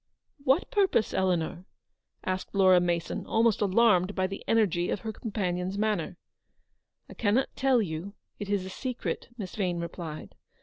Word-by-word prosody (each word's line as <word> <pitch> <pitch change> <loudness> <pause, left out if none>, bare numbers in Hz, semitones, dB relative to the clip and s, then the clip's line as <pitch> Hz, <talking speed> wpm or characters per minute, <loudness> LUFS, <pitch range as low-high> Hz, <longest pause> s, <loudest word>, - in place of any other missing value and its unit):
" 280 - -28
What 280 +7 +3
purpose, 385 - +2
Eleanor? 180 -1 0 0.3
" - - -50
asked 185 +2 -3
Laura 185 -2 +6
Mason, 170 -1 -1
almost 225 -1 +2
alarmed 200 -2 +3
by 185 - +1
the 195 +1 -5
energy 190 -6 +2
of - - -2
her 220 -1 -4
companion's 190 -4 -2
manner. 215 0 -1 0.5
" - - -51
I - - -11
cannot 230 +4 +1
tell 265 -4 +3
you. 180 +3 -5 0.2
It 205 - -5
is 200 -2 0
a - - -6
secret/' 250 +5 -4
Miss 195 -5 -6
Vane 180 -4 0
replied. 170 -2 -6
195 Hz, 165 wpm, -28 LUFS, 180-220 Hz, 0.5 s, Laura